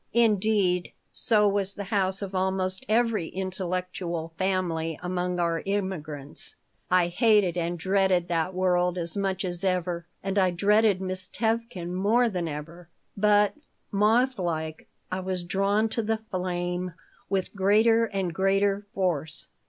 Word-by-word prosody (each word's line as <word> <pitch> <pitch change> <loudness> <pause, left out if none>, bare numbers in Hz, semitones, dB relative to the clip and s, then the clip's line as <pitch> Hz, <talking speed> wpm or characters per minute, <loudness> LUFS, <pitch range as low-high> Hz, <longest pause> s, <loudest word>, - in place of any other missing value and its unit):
Indeed, 210 -5 +2 0.2
so 210 -3 +3
was 200 -1 +1
the 200 - -4
house 190 0 +1
of 195 -1 -6
almost 190 +4 -1
every 225 -5 +2
intellectual 180 -3 -4
family 170 -4 -1
among 180 0 -1
our 170 -1 0
immigrants. 165 -8 -4 0.3
I 180 -1 +4
hated 200 -1 +3
and 175 0 -1
dreaded 190 0 +2
that 170 +2 -1
world 180 -1 +2
as 170 -2 -2
much 195 -1 -1
as 175 0 -3
ever 180 -2 -1 0.2
and 195 +1 0
I 185 -1 +4
dreaded 205 +2 +3
Miss 185 -1 -1
Tevkin 220 -6 -2
more 220 +6 +3
than 180 -5 -2
ever, 165 +3 -7 0.3
but, 205 0 +4 0.4
moth 230 +5 +3
like, 160 -3 -3 0.2
I 185 - -1
was 185 -1 -2
drawn 195 +4 +1
to 230 - -1
the 220 0 0
flame 180 -1 -2 0.3
with 190 -2 -1
greater 220 +4 +4
and 195 -5 -2
greater 195 +2 +1
force. 165 -6 -1
185 Hz, 135 wpm, -27 LUFS, 175-205 Hz, 0.4 s, I